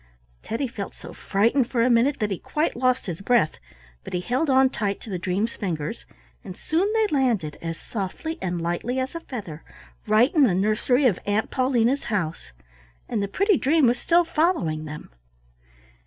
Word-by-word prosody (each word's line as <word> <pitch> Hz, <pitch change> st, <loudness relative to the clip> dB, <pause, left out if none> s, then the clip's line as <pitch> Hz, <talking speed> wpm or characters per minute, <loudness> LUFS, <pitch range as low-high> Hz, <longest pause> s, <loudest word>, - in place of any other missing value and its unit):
Teddy 235 Hz, +5 st, -2 dB
felt 205 Hz, -4 st, -7 dB
so -, -, -11 dB
frightened 230 Hz, +6 st, +1 dB
for 235 Hz, -3 st, +1 dB
a 250 Hz, -, +3 dB
minute 250 Hz, +5 st, +3 dB
that 210 Hz, -1 st, -1 dB
he 190 Hz, -, -2 dB
quite 310 Hz, +2 st, -1 dB
lost 255 Hz, +1 st, +1 dB
his 175 Hz, -1 st, -5 dB
breath, 230 Hz, -6 st, +2 dB, 0.4 s
but -, -, -9 dB
he 180 Hz, -, 0 dB
held 255 Hz, -, 0 dB
on 265 Hz, 0 st, +5 dB
tight 205 Hz, -6 st, -2 dB
to 220 Hz, -, -10 dB
the 180 Hz, -, -2 dB
dream's 190 Hz, +6 st, -1 dB
fingers, 155 Hz, -, -4 dB, 0.4 s
and 180 Hz, -, -9 dB
soon 360 Hz, +6 st, 0 dB
they 445 Hz, -1 st, +3 dB
landed, 225 Hz, -, +1 dB
as 165 Hz, -1 st, -4 dB
softly 240 Hz, -, -5 dB
and 175 Hz, -1 st, -2 dB
lightly 175 Hz, +9 st, -2 dB
as 260 Hz, 0 st, -2 dB
a 335 Hz, -, -4 dB
feather, 200 Hz, -, -8 dB, 0.4 s
right 220 Hz, +5 st, +4 dB
in 310 Hz, -, +4 dB
the 210 Hz, -9 st, +4 dB
nursery 215 Hz, +7 st, +2 dB
of 210 Hz, -8 st, +3 dB
Aunt 205 Hz, +2 st, 0 dB
Paulina's 255 Hz, 0 st, +1 dB
house, 165 Hz, -, -3 dB, 0.6 s
and -, -, -1 dB
the 200 Hz, -, -1 dB
pretty 395 Hz, -, +2 dB
dream 295 Hz, +2 st, +3 dB
was 240 Hz, +1 st, +2 dB
still 345 Hz, 0 st, +3 dB
following 300 Hz, -, 0 dB
them. 150 Hz, -, -9 dB
230 Hz, 185 wpm, -24 LUFS, 185-265 Hz, 0.6 s, on